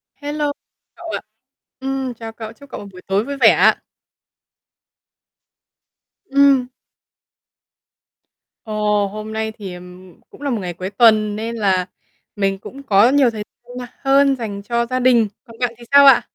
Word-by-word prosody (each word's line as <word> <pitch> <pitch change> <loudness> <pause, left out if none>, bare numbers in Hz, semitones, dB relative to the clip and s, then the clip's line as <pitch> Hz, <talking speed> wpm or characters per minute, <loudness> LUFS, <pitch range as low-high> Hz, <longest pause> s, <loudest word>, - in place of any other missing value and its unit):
Hello 290 +1 -2 0.4
cậu - - -9
ạ. - - -3 0.6
Ừm, 265 -1 -3
chào 225 -1 -8
cậu, 220 -1 -8
chúc 280 +4 -17
cậu - - -7
một 205 - -10
buổi 185 -1 -13
tối 195 +3 +1
vui 280 +1 -5
vẻ - - +6
ạ. - - +4 2.5
Ừm. 275 -2 +4 2.0
Ồ, 210 -2 0
hôm 215 +2 -7
nay 220 0 -2
thì 195 -4 -8 0.5
cũng - - -17
là 285 - -2
một 235 -4 -1
ngày 180 -1 -4
cuối 185 +2 -5
tuần 215 0 +4
nên 225 +2 -4
là 190 -4 +1 0.5
mình 195 -1 0
cũng 275 +7 -11
có 210 -2 +5
nhiều 275 -2 +4
thời 215 -2 -5 0.3
nha 250 -1 -6
hơn 275 0 +4
dành 215 -5 -5
cho 235 +3 0
gia 255 +2 -2
đình. 245 -3 +4 0.2
Còn 230 -3 -15
bạn 245 -2 0
thì 240 - -14
sao 280 0 +8
ạ? 275 -3 +8
230 Hz, 160 wpm, -19 LUFS, 210-270 Hz, 2.5 s, sao